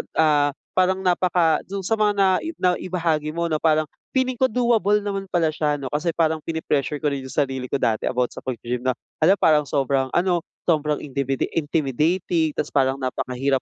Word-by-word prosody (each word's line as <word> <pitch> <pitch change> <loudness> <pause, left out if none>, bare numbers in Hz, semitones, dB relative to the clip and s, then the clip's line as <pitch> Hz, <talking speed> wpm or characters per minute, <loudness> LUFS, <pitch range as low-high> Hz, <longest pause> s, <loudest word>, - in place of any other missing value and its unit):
ah, 145 -3 +3 0.2
parang 185 +1 +1
napaka 175 -3 +2
do'n 195 0 -5
sa 225 +3 0
mga 210 -1 +3
nai 195 - +2
naibahagi 170 - -1
mo 170 -1 -1
'no 155 - +1
parang 155 -2 +1 0.2
feeling 255 -2 0
ko, 260 - +3
doable 225 -4 +2
naman 200 -1 -3
pala 165 -3 +2
siya 150 -1 0
'no 135 -2 -5
kasi 150 +5 -1
parang 160 -1 +1
pine-pressure 150 -3 -1
ko 150 - +2
rin 140 -1 -3
yung 130 - -8
sarili 135 -3 -1
ko 140 - -1
dati 110 -1 +1
about 125 -1 0
sa - - -11
pag-gy-gym 125 0 -4
na, 130 - +2 0.2
hala 170 +5 +5
parang 150 -2 +4
sobrang 135 -1 0
ano, 175 -1 +2 0.3
sobrang 150 -2 +2
intimiti 135 -1 -2
intimidating 160 +2 0
ta's - - -1
parang 135 -1 +2
napakahirap 130 +1 -1
155 Hz, 180 wpm, -23 LUFS, 140-185 Hz, 0.3 s, hala